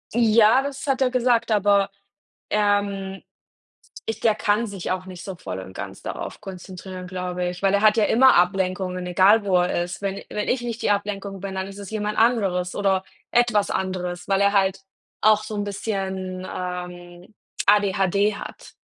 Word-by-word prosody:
Ja, 230 +1 +5
das 275 0 -5
hat 270 -1 0
er 260 - +4
gesagt, 240 -2 +2
aber, 200 -1 +3 0.6
ähm, 200 -2 0 0.9
ich 225 - -3
der 220 -2 +3
kann 215 +3 +1
sich 195 -4 -5
auch 185 0 -2
nicht 185 -2 -9
so 190 -2 -6
voll 95 - -6
und 95 0 -9
ganz - - -7
darauf - - -6
konzentrieren, 185 -1 -8
glaube 180 -1 -3
ich, 180 +1 -8
weil 195 0 +3
er 200 - +3
hat 215 0 +5
ja 220 - +4
immer 260 +3 +5
Ablenkungen, 185 0 +1
egal 195 +4 +4
wo 190 -2 +2
er 175 -1 0
ist. 175 +1 -8
Wenn 195 0 -2
wenn 210 - -3
ich 250 -1 +1
nicht 235 -1 -5
die - - +3
Ablenkung 200 -1 -2
bin, 190 0 -6
dann 190 0 -2
ist 195 +1 -10
es 200 -2 -8
jemand 210 -1 -3
anderes 195 -6 +2
oder 195 -2 +1 0.3
etwas 235 -4 +2
anderes, 180 -2 -3
weil 195 0 +2
er 200 0 +3
halt 195 -1 +2 0.4
auch 215 0 +4
so 215 0 -6
'n 205 - -1
bisschen, 190 -2 -4
ähm, 180 0 -7 0.3
ADHD 200 0 +3
hat. - - -10
195 Hz, 180 wpm, -23 LUFS, 185-210 Hz, 0.9 s, Ja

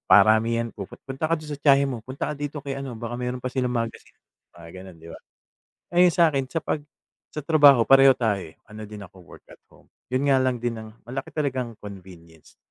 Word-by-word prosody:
Paramihan, 110 +4 +4
puput 100 -3 -9
"Punta 135 +3 -3
ka - - +4
dun 155 -1 -10
sa 145 - -5
tiyahin 140 -1 +4
mo. 125 - -4
Punta 130 +4 -5
ka - - -6
dito 145 0 -5
kay 135 -1 -5
ano, 135 -3 -6
baka 120 0 -5
meron 125 0 -4
pa 130 - -3
silang 125 -1 -1
magazine." 115 -1 -4 0.4
Mga 85 -1 -13
ganun, 95 -1 -11
di 85 - -12
ba? - - -10 0.8
Ah, 175 - +4
yung 180 - +7
sa'kin 150 -6 +2
sa - - -4
pag 150 - -2 0.5
sa 150 - -5
trabaho 145 -7 +6
pareho 135 0 +7
tayo, 105 -5 0
eh, 80 -3 -12
ano 110 0 -9
din 105 -1 -9
ako 95 0 -17
work - - -16
at - - -16
home, - - -21 0.2
yun 130 +3 0
nga 135 - +5
lang 130 -1 0
din 120 -1 -1
ang 110 0 -13
malaki 130 +3 -6
talaga 140 -4 -1
ang 115 -2 -12
convenience. 90 -5 -13
125 Hz, 220 wpm, -24 LUFS, 110-140 Hz, 0.8 s, yung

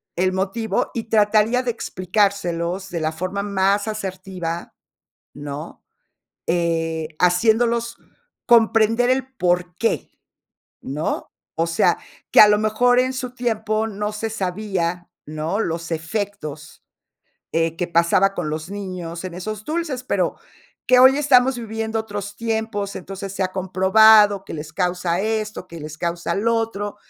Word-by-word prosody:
el 185 +1 +1
motivo, 195 +2 -1
y 230 - -3
trataría 220 +3 +3
de 245 - 0
explicárselos 185 -3 -1
de 170 -2 -3
la 155 0 0
forma 185 +4 -3
más 200 +1 +1
asertiva, 185 -5 -5 0.6
¿no?, 145 +3 -7 0.6
eh, 165 -2 0
haciéndolos 230 +6 +2 0.5
comprender 230 +1 +4
el 260 0 +1
porqué, 180 +3 0 0.7
¿no? 150 +4 -3 0.3
O 165 +1 0
sea, 165 - +2 0.3
que - - +8
a 210 - +10
lo 210 0 +4
mejor 245 +3 +3
en 255 +1 +1
su 255 -1 -5
tiempo 220 -2 -1
no 210 0 -3
se 220 +1 -3
sabía, 180 -3 -2 0.2
¿no?, 155 +6 -3
los 165 -4 -3
efectos 160 -3 -5 0.7
eh, 165 0 0
que 175 - -2
pasaba 175 +4 +3
con 155 -4 -3
los 155 +4 -5
niños 185 -4 -6
en 180 -2 -6
esos 215 +3 -6
dulces, 305 -5 -3
pero, - - 0 0.5
que 250 0 +5
hoy 260 +2 +7
estamos 265 -3 +4
viviendo 225 0 -3
otros 205 -2 -6
tiempos, 220 -3 -2
entonces 195 +1 -7
se 195 - -2
ha 185 - -3
comprobado 200 +2 +5
que - - -9
les 155 0 -7
causa 180 0 0
esto, 215 -3 -3
que 170 - -9
les 155 0 -8
causa 170 0 -2
lo 230 +3 +1
otro. 205 -2 -3
200 Hz, 135 wpm, -21 LUFS, 175-220 Hz, 0.7 s, a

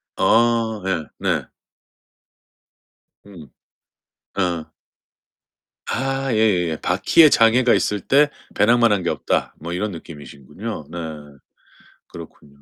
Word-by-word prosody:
아. 115 -2 +2
예 85 -6 -2
네. - - -1 1.8
음. 85 -9 -14 0.9
어. 85 -4 -2 1.2
아 135 +1 -2
예예예. 90 -7 +1
바퀴에 100 - +4
장애가 120 0 +4
있을 105 -1 0
때 145 +8 +3 0.3
배낭만 115 +2 +4
한 105 - +2
게 - - -1
없다. - - -2
뭐 85 +2 -7
이런 105 +4 -2
느낌이시군요. 80 - -9
네. 85 - -7 1.1
그렇군요. 70 -4 -14
100 Hz, 185 characters per minute, -21 LUFS, 85-115 Hz, 1.8 s, 바퀴에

